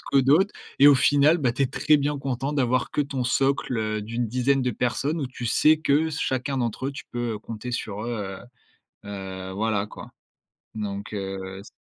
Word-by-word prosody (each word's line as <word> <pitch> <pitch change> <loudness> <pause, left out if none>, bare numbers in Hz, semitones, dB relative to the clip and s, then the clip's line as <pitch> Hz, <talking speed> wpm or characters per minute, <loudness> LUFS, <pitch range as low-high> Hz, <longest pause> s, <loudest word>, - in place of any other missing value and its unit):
que 140 - +6
d'autres 155 +10 +4 0.3
et 140 - +8
au 145 - +9
final, 145 +5 +4
bah, 130 -6 +1
tu 125 - 0
es - - +3
très 150 +3 +3
bien 145 0 0
content 135 +1 -2
d'avoir 130 -3 +1
que - - +1
ton 140 -3 -2
socle, 135 0 +1
heu, 110 -1 -1
d'une 115 +3 -3
dizaine 130 +3 +1
de 125 - +1
personnes 135 +7 -1
où 140 - -1
tu 125 -1 -8
sais 155 +7 +4
que 150 +1 +2
s 160 -1 -4
chacun 130 +1 -1
d'entre 120 +1 -2
eux, 140 - -2
tu 135 - -7
peux, 120 -1 -2
heu, - - -5
compter 115 +3 -6
sur 105 -3 -4
eux, 105 -5 -4 0.7
heu - - -10
heu, 95 -1 -6
voilà 105 0 0
quoi. - - -10 0.7
Donc 100 -1 -5
heu, 95 -1 -5
s 100 - -12
125 Hz, 210 wpm, -25 LUFS, 105-140 Hz, 0.7 s, au